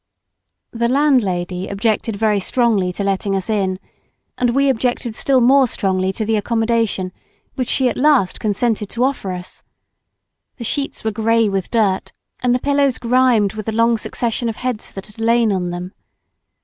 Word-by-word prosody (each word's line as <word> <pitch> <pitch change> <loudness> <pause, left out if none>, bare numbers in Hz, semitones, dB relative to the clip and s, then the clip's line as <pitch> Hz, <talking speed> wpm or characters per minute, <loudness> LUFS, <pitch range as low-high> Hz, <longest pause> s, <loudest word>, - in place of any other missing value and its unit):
The 235 0 0
landlady 195 -10 +1
objected 215 +2 -1
very 210 -1 +1
strongly 210 -3 +1
to 200 - -4
letting 195 0 -1
us 195 +2 -2
in, 190 -3 0 0.6
and 245 - +1
we 275 0 +3
objected 245 -2 0
still 260 +3 +2
more 265 +2 +5
strongly 190 -3 0
to 220 - -3
the 220 0 +1
accommodation 225 -3 0 0.4
which 255 -3 -3
she 265 - +2
at 240 - -2
last 265 -9 +3
consented 215 0 -1
to 240 - -1
offer 260 -8 -1
us. 180 0 -7 1.0
The 240 - -6
sheets 275 +4 -3
were 220 - 0
grey 225 +1 +2
with 195 -2 -2
dirt, 205 -5 0 0.3
and 245 0 +2
the - - 0
pillows 280 -1 +1
grimed 235 -4 +2
with 215 -1 -7
the - - 0
long 230 +1 +3
succession 230 +1 -2
of 225 - -4
heads 250 -3 -4
that 195 - -9
had 210 +1 -15
lain 230 0 +3
on 180 -2 -1
them. 175 +1 -6
225 Hz, 170 wpm, -19 LUFS, 195-245 Hz, 1.0 s, more